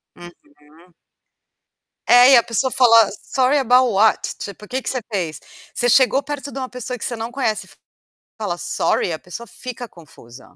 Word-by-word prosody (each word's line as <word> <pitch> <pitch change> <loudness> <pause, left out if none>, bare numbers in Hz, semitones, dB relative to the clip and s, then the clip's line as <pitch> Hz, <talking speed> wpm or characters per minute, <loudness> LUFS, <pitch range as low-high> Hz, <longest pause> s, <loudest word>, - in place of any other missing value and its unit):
Uhum. 175 0 -15 1.6
É, 245 +2 +7
e - - +8
a 235 - +5
pessoa 235 +4 -1
fala: 230 -5 +5 0.2
"Sorry 260 +2 +2
about 250 -2 +3
what?" 210 +3 +3 0.2
ti 200 - -6
tipo, 210 +1 -15
que 260 +3 -3
que - - -4
você 255 - -3
fez? 175 -7 -3 0.3
Você 245 - 0
chegou 260 +2 +4
perto 285 -1 -6
de 270 - -7
uma 260 -1 -5
pessoa 250 0 -6
que - - -6
você 240 - -3
não 225 +1 -6
conhece 245 -5 -2
e, - - -15 0.7
fala: 200 -5 -3
"Sorry." 175 - -1
a 160 - -4
pessoa 180 +7 -9
fica 245 +2 -8
confusa. 130 -8 -17
240 Hz, 180 wpm, -20 LUFS, 205-255 Hz, 1.6 s, e